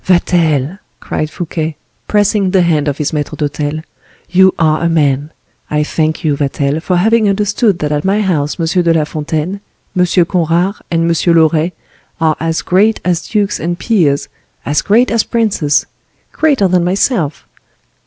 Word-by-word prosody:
"Vatel," 170 -2 +1 0.2
cried 155 - -3
Fouquet, 160 -2 -4 0.3
pressing 205 -1 +2
the 185 -1 +3
hand 155 -3 +1
of 145 -1 -1
his 150 -1 -2
maitre 150 -1 -3
d'hotel, 150 +1 -3 0.5
"you 190 +1 +5
are 155 -1 +2
a 170 - +1
man! 145 -3 +1 0.4
I 150 0 +1
thank 155 +2 -1
you, 150 -3 +1
Vatel, 140 +1 -1
for 180 +2 -1
having 220 +3 +3
understood 205 0 +1
that 150 -3 -2
at 150 0 -1
my 200 +3 +1
house 160 -6 -1
M. 165 - 0 0.2
de 170 -1 +2
la 155 - +2
Fontaine, 155 +5 -3 0.3
M. 180 0 +3 0.2
Conrart, 175 +3 0
and 165 0 +1
M. 170 +1 +2
Loret 160 +1 +2 0.5
are 160 -2 +2
as 165 0 -2
great 210 +5 +2
as 175 -2 -1
dukes 205 -2 0
and 170 +2 -2
peers, 170 -11 +1 0.4
as 145 +1 +1
great 235 +5 +2
as 230 -1 +2
princes, 210 -11 0 0.5
greater 280 -10 +2
than 180 -1 +2
myself. 180 - 0
170 Hz, 160 wpm, -14 LUFS, 150-195 Hz, 0.5 s, you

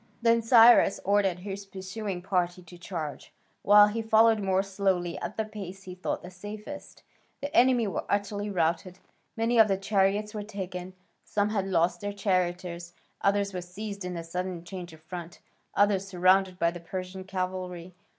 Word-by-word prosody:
Then 230 0 +4
Cyrus 230 -2 +6
ordered 195 -2 +2
his 200 +1 -6
pursuing 190 -1 -5
party 180 -1 -1
to 175 +1 -13
charge, 165 -5 -6 0.3
while 205 +1 +8
he 215 +2 -2
followed 220 0 +4
more 190 -1 +1
slowly 190 -3 -1
at - - -5
the 220 - 0
pace 195 -3 -8
he 185 - -8
thought 180 - -4
the 180 - -9
safest. 210 +9 -9 0.4
The 285 +1 -5
enemy 245 -1 +5
were 200 - -3
utterly 205 0 -1
routed: 175 0 -1 0.4
many 230 +1 +2
of 220 - +8
the 195 -2 +1
chariots 200 +1 +1
were 210 - -4
taken, 185 -3 -6 0.3
some 205 0 0
had 200 -3 -1
lost 175 -1 +1
their 205 0 -3
charioteers, 180 -3 -1 0.3
others 200 0 +1
were 180 - -3
seized 200 +3 -7
in 180 0 -4
the 170 - -4
sudden 180 +1 -4
change 175 -1 -8
of 160 0 -16
front, 170 0 -8 0.4
others 200 -1 +3
surrounded 185 0 +3
by 170 -1 +2
the 175 - -8
Persian 185 +2 -6
cavalry. 185 -2 -4
190 Hz, 170 wpm, -28 LUFS, 180-205 Hz, 0.4 s, while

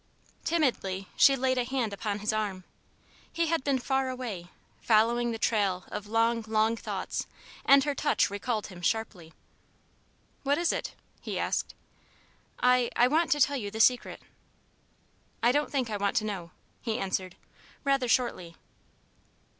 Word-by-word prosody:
Timidly 235 - 0
she 275 - +6
laid 260 -1 +1
a - - +2
hand 240 -4 -2
upon 205 0 -3
his 215 - 0
arm. 205 -4 -2 0.7
He 335 -1 0
had 330 -4 0
been 275 -1 +1
far 265 +1 0
away, 235 -9 -5 0.3
following 235 +2 +3
the 230 - -3
trail 200 -5 0
of 210 0 -5
long, 230 +1 +1
long 220 +1 +2
thoughts, - - -4 0.4
and 275 0 +7
her 290 0 0
touch 290 +2 +2
recalled 215 +2 -2
him 180 -3 -10
sharply. 185 -4 -2 1.1
"What 285 +1 +1
is 340 0 +2
it?" - - -4 0.3
he - - -4
asked. - - -2 0.8
"I 250 -1 +4
I 245 - +5
want 320 +5 +2
to 295 - -4
tell 285 +1 +3
you 205 -5 -4
the 220 +2 -7
Secret." 250 +2 +2 1.2
"I 240 - +5
don't 295 +3 +1
think 255 -5 -1
I 210 - -1
want 200 +2 0
to 220 -2 +1
know," 190 -5 -4 0.3
he 225 -2 -2
answered, 190 -4 -3 0.5
rather 275 -3 +1
shortly. 225 -9 0
230 Hz, 155 wpm, -29 LUFS, 205-265 Hz, 1.2 s, and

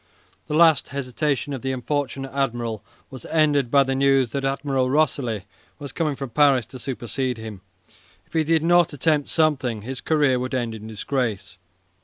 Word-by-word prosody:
The 150 - -2
last 160 -3 +5
hesitation 140 +1 -2
of 130 - -5
the 135 - -2
unfortunate 135 +1 -3
admiral 120 -5 -2 0.3
was 130 -3 -9
ended 145 -5 +2
by 140 +2 +5
the 135 0 -2
news 135 -2 +3
that 140 -1 -3
Admiral 135 -1 0
Rosilly 130 -7 0 0.3
was 140 -3 -8
coming 155 -2 -1
from 135 -2 -6
Paris 135 -3 +4
to 130 - -8
supersede 125 0 -3
him. 110 -4 -8 0.6
If - - -29
he 160 -1 +2
did 160 0 +2
not 175 -1 +4
attempt 145 0 +1
something, 135 -9 +1
his 130 +2 -6
career 145 -5 +2
would 130 +1 -3
end 120 -3 -2
in 110 0 -9
disgrace. 110 -4 -3
135 Hz, 170 wpm, -23 LUFS, 125-145 Hz, 0.6 s, last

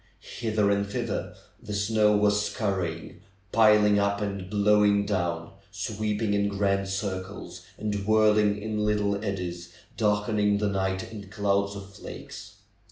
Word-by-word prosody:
Hither 110 -3 +1
and 100 0 +1
thither 100 - -3 0.3
the 105 - -5
snow 105 0 +3
was 105 0 +3
scurrying, 95 -6 -3 0.3
piling 105 -2 +5
up 100 0 +1
and 100 -3 -4
blowing 105 0 +3
down, 85 -5 -2 0.2
sweeping 105 +2 -2
in 100 0 +2
grand 100 -1 0
circles, 95 0 -5 0.2
and 105 0 -2
whirling 105 -1 +4
in 105 0 -2
little 105 -1 0
eddies, 90 -4 -4 0.2
darkening 105 -1 +2
the 105 0 0
night 95 0 -2
in 100 -3 -9
clouds 100 -1 0
of 100 0 -9
flakes. 105 0 -10
100 Hz, 130 wpm, -27 LUFS, 100-105 Hz, 0.3 s, piling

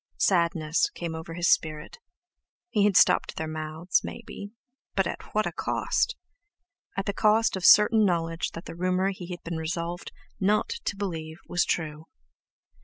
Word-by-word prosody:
Sadness 165 - +2
came 170 -2 -4
over 160 +1 -7
his 175 0 0
spirit. 155 -1 0 0.7
He 205 -2 +3
had 205 -3 +4
stopped - - +4
their 160 - -3
mouths, 155 +3 -1
maybe, 200 - -8 0.5
but 195 - +2
at 170 - -6
what 215 - +2
a - - -2
cost! 485 - 0 0.8
At 195 - -1
the 200 - -1
cost 215 +1 +3
of 190 - -5
certain 215 +3 +7
knowledge 165 -3 0
that 165 - -8
the 165 - -7
rumour 185 +2 0
he 185 -2 -8
had 175 -1 -7
been 170 -1 -4
resolved 170 +2 -4 0.3
not 210 +2 +2 0.2
to - - -1
believe 160 -5 -5
was 175 - +2
true. 155 -1 -3
175 Hz, 160 wpm, -27 LUFS, 160-195 Hz, 0.8 s, certain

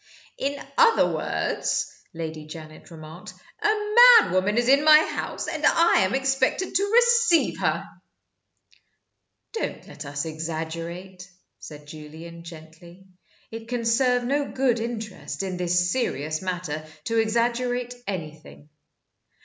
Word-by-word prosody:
"In 280 +1 -2 0.2
other 465 -1 +5
words," - - -1 0.3
Lady 160 -2 -7
Janet 155 -1 -11
remarked, 165 +5 -11 0.3
"a - - +2
madwoman 425 - +5
is 240 0 +2
in 275 +2 +5
my 305 0 +8
house, 310 - -3
and - - -5
I 335 +1 +4
am 190 +5 +1
expected 270 +7 0
to 405 +2 +1
receive 475 -6 +3
her!" - - 0 1.7
"Don't 450 - -5
let 145 - -9
us 145 +1 -4
exaggerate," 165 +4 -6 0.3
said 150 -1 -11
Julian, 160 +3 -11
gently. 170 +2 -13 0.5
"It 225 0 -8
can 240 -1 -3
serve 245 +1 +2
no 280 +3 -1
good 255 -3 +1
interest, 225 -4 -5
in 185 -2 -4
this 180 0 +1
serious 155 - -2
matter, 175 -5 -4 0.2
to 230 +4 0
exaggerate 240 +2 0
anything. 155 -5 -8
195 Hz, 120 wpm, -24 LUFS, 160-265 Hz, 1.7 s, my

